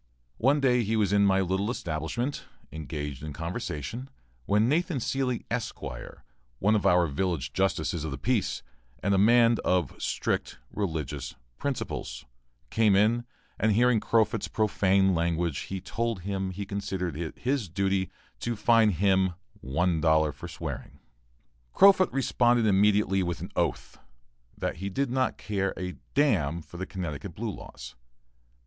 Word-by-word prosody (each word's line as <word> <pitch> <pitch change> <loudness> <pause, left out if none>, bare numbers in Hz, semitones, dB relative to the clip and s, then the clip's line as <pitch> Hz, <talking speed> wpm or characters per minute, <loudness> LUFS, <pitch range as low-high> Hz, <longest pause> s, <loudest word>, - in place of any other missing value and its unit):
One 135 +5 +4
day 125 -3 +3
he 110 +2 0
was 105 -3 +2
in 100 0 +5
my 95 0 +3
little 95 +3 0
establishment 85 - -3 0.3
engaged 75 -3 -5
in 75 -1 -6
conversation, 85 - -5 0.4
when 105 +3 +3
Nathan 165 +3 +1
Seelye, 125 0 -1
Esq., 120 -1 -3 0.8
one 105 +8 +2
of 105 - +2
our 90 0 +5
village 80 -1 -2
justices 85 -4 0
of 80 - -3
the 70 - -4
peace, 65 - 0 0.4
and 100 - +2
a 95 - +3
man 115 +2 +5
of 90 -7 +1
strict - - -1 0.2
religious 75 -7 -3 0.2
principles, 115 - -4 0.5
came 110 -3 +4
in, 115 +4 +3 0.3
and 110 -1 +3
hearing 120 +1 +4
Crofut's 110 0 +1
profane 95 -3 +2
language 85 -2 0
he 95 - -3
told 115 +1 -3
him 95 0 -2
he 100 +2 -5
considered 95 -4 -3
it 80 0 -5
his 125 -6 -1
duty 95 +1 0 0.3
to 120 0 -2
fine 110 +1 +4
him 95 0 +2 0.2
one 85 +2 0
dollar 80 -1 +3
for 70 - -9
swearing. - - -7 0.8
Crofut 195 -1 +6
responded 120 -2 +2
immediately 100 -1 +3
with 85 -2 -2
an - - -7
oath, - - -2 0.6
that - - -3
he 95 +3 -4
did 135 +6 -1
not 130 0 0
care 95 -2 -2
a 90 0 -3 0.2
d 145 - +5
n 85 - +1
for 85 - -12
the 95 +2 -4
Connecticut 90 -7 -5
blue - - -3
laws. - - -10
95 Hz, 150 wpm, -28 LUFS, 85-115 Hz, 0.8 s, Crofut